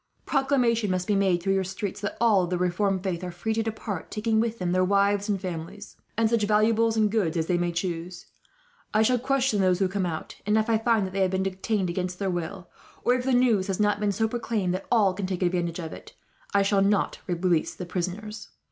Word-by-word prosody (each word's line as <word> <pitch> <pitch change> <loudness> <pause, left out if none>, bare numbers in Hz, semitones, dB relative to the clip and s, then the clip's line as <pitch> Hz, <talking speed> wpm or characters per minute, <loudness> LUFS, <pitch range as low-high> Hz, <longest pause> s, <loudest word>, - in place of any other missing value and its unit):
Proclamation 250 -6 +2
must 185 -1 0
be 210 - +1
made 190 -3 +2
through 195 - +2
your 195 0 +1
streets 195 +2 -5
that 205 - -4
all 220 -4 +4
of - - -7
the 180 - 0
reformed 185 +2 0
faith 185 -2 -2
are 180 - -3
free 175 +6 -3
to 225 - 0
depart, 220 -4 -4
taking 220 0 0
with 230 0 0
them 180 -3 -2
their 185 +1 +3
wives 200 +2 +2
and 200 -2 +1
families, 185 +2 -7 0.2
and 225 -1 +3
such 230 0 +1
valuables 220 +2 +3
and 215 -2 +3
goods 190 -7 0
as 160 - 0
they 180 - +1
may 175 0 0
choose. 175 0 -4 0.7
I 215 - +5
shall 250 +2 +3
question 260 -4 +1
those 185 -1 +3
who 190 0 +2
come 190 -1 -1
out, 160 -2 -6
and 210 +2 +2
if 220 +1 +1
I 220 - +3
find 225 -3 +2
that 185 - -5
any 195 - 0
have 190 - +3
been 190 0 0
detained 190 0 -1
against 180 0 -3
their 195 -1 -1
will, 175 +1 -4 0.4
or 245 - +4
if 250 0 -1
the 265 - +1
news 240 -6 +3
has 195 -1 -2
not 205 -1 +2
been 210 -1 +1
so 220 +2 0
proclaimed 220 -5 -1
that 185 +1 -4
all 210 -6 +4
can 190 0 -3
take 185 -1 -2
advantage 175 -2 0
of 165 -3 -6
it, - - -12 0.4
I 200 0 +3
shall 195 0 +2
not 200 +1 +1
release 175 -2 0
the 180 - -6
prisoners. 185 +5 -5
195 Hz, 235 wpm, -26 LUFS, 180-220 Hz, 0.7 s, I